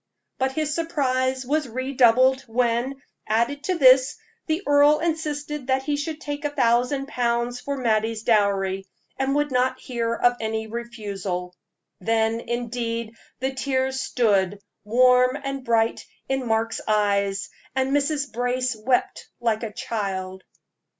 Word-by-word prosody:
But 265 0 0
his 305 0 -1
surprise 260 -5 0
was 300 +2 0
redoubled 255 +1 +3
when, 245 +3 0 0.2
added 235 +7 0
to 370 - +1
this, 260 -1 +6 0.3
the 320 +4 -1
earl 290 +1 +5
insisted 300 -4 -3
that 265 0 +1
he 295 +1 0
should 300 +2 -4
take 290 -1 -5
a 295 - 0
thousand 255 0 +1
pounds 240 -1 -1
for 280 +2 -4
Mattie's 225 -2 0
dowry, 195 -3 +1 0.3
and 270 +1 +1
would 295 -1 +1
not 250 0 +1
hear 230 -2 -2
of 245 +1 +2
any 220 0 -2
refusal. 205 -6 -5 0.5
Then, 225 +3 +1
indeed, 235 -1 -3 0.3
the 265 +1 -1
tears 265 0 -1
stood, 205 -6 +1 0.2
warm 250 +4 +4
and 275 -1 -4
bright, 230 -2 +1 0.2
in 265 -2 -1
Mark's 225 0 0
eyes, 200 -2 +1 0.2
and 265 0 +1
Mrs. 285 -2 0
Brace 250 +1 0
wept 245 +4 -1
like 225 -2 0
a 225 -2 -4
child. 195 -5 -4
250 Hz, 135 wpm, -24 LUFS, 225-270 Hz, 0.5 s, this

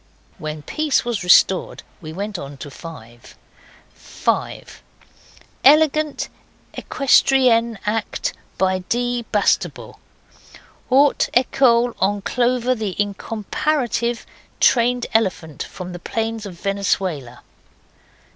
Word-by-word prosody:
When 155 -1 -6
peace 305 - 0
was 235 -5 -2
restored 180 +1 +4 0.2
we 155 -2 -8
went 200 +3 -5
on 140 0 -8
to 145 +1 -9
5.) 120 -8 -12 0.6
5. - - -3 0.8
Elegant 305 +1 +4 0.5
equestrian 250 -4 +3
act 210 +1 -2 0.2
by 185 0 +1
D. 245 +5 -1
Bastable. 205 -1 0 0.9
Haute 275 +3 +4
ecole, 245 -1 +3
on 200 +1 0
Clover, 250 +1 +1
the 215 -6 -4
incomparative 235 +4 -1 0.3
trained 245 0 +3
elephant 180 -9 -1
from 180 -1 -7
the 175 - -7
plains 225 +2 -3
of 175 -3 -11
Venezuela. 185 -10 -2
220 Hz, 95 wpm, -20 LUFS, 185-245 Hz, 0.9 s, restored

